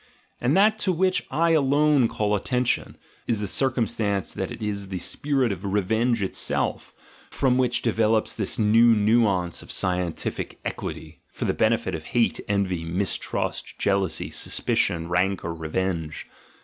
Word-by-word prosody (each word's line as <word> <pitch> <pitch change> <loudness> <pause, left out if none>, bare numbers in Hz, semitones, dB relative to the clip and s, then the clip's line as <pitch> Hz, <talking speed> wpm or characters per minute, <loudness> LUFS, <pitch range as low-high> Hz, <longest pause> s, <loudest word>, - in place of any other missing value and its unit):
And 130 +8 +2
that 215 +2 +4
to 195 - +1
which 185 +2 +1
I 165 +4 +2
alone 145 -3 +4
call 105 -2 -1
atten 125 +5 -1
tion, - - -1 0.3
is 115 -3 +1
the 105 - -2
circumstance 110 -5 0
that - - -4
it - - -7
is 100 -2 -3
the 95 -1 -4
spirit 135 +6 0
of 95 -1 -5
revenge 110 +3 +1
itself, 95 - -2 0.3
from 130 -2 +1
which 125 -1 +1
develops 110 -1 +1
this 105 -4 -1
new 115 +2 +5
nuance 105 -5 +2
of - - -9
scientific 90 -2 -2
equity 80 -2 -6
(for - - -5
the - - +1
benefit 110 -4 +1
of 80 -1 -5
hate, 115 - +2
envy, 95 -4 0
mistrust, 90 +4 -2
jealousy, 95 -5 0
suspicion, 85 -1 -1
rancour, 90 -1 0
revenge). 80 0 -3
105 Hz, 145 wpm, -25 LUFS, 95-125 Hz, 0.3 s, new